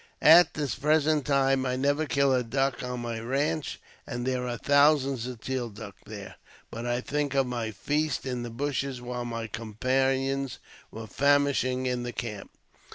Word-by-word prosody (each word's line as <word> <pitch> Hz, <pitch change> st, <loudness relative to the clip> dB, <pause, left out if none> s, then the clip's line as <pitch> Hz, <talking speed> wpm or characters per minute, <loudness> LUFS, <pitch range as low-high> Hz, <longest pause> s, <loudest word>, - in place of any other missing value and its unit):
At 170 Hz, +3 st, +8 dB
this 145 Hz, -6 st, -1 dB
present 150 Hz, 0 st, +2 dB
time 135 Hz, -1 st, +3 dB
I 125 Hz, -1 st, -1 dB
never 145 Hz, +4 st, +1 dB
kill 140 Hz, -1 st, +2 dB
a 130 Hz, -, +2 dB
duck 135 Hz, +2 st, -1 dB
on 125 Hz, -1 st, -4 dB
my 115 Hz, -1 st, -4 dB
ranche, 140 Hz, +6 st, -1 dB, 0.3 s
and 120 Hz, 0 st, -4 dB
there 125 Hz, -1 st, -1 dB
are 120 Hz, -1 st, -3 dB
thousands 140 Hz, -3 st, +3 dB
of 125 Hz, -3 st, -8 dB
teal 130 Hz, -3 st, -3 dB
duck 105 Hz, -1 st, -10 dB
there, 100 Hz, -2 st, -9 dB, 0.3 s
but 115 Hz, +1 st, -5 dB
I 120 Hz, +1 st, 0 dB
think 145 Hz, +1 st, -2 dB
of 135 Hz, -1 st, +3 dB
my 120 Hz, -3 st, -3 dB
feast 145 Hz, +8 st, -1 dB
in 125 Hz, -2 st, -3 dB
the 120 Hz, -, -5 dB
bushes 135 Hz, +1 st, -2 dB
while 125 Hz, 0 st, -5 dB
my 115 Hz, -1 st, -4 dB
companions 130 Hz, +5 st, -1 dB, 0.3 s
were 110 Hz, 0 st, -8 dB
famishing 140 Hz, -1 st, +2 dB
in 125 Hz, -1 st, -1 dB
the 120 Hz, 0 st, -5 dB
camp. 105 Hz, -4 st, -5 dB
130 Hz, 170 wpm, -28 LUFS, 120-140 Hz, 0.3 s, At